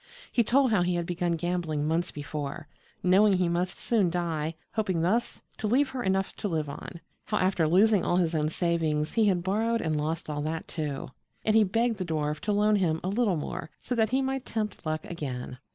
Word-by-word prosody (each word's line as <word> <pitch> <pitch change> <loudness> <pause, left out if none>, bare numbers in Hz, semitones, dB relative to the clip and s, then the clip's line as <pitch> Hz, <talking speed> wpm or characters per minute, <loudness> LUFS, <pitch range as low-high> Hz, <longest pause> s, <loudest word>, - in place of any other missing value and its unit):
He 235 - +3
told 260 +3 +3
how 210 -5 +3
he 175 0 +1
had 170 -1 -1
begun 175 0 -1
gambling 165 -3 -1
months 165 +2 0
before, 145 -1 -5 0.4
knowing 195 +3 +5
he 185 -1 +2
must 175 +1 -1
soon 210 -7 +2
die, 165 -2 -2 0.2
hoping 190 -7 0
thus 220 +8 0 0.2
to 215 - -1
leave 260 +5 +3
her 260 - -3
enough 190 -2 0
to - - -2
live 160 -5 -1
on; 170 +4 -8 0.2
how, 210 - -1
after 185 -4 +2
losing 195 +4 +4
all - - +1
his 170 -2 +1
own 155 -1 +1
savings, 160 -3 0
he 225 -2 +3
had 180 -3 +2
borrowed 225 +5 +1
and 155 -5 0
lost 160 +2 -2
all 150 -1 -3
that, 160 +2 -3
too. 150 -5 -4 0.3
And 215 - +3
he 220 - +7
begged 225 +3 +1
the 190 - -2
dwarf 150 -2 -1
to 210 - -2
loan 210 +1 +3
him 165 -5 +1
a 185 - -1
little 205 -3 +1
more 150 - -5
so - - -4
that 225 -2 +2
he 265 +1 +1
might 265 -1 -2
tempt 215 -8 -4
luck 155 0 -2
again. 130 -6 -5
175 Hz, 215 wpm, -28 LUFS, 160-215 Hz, 0.4 s, he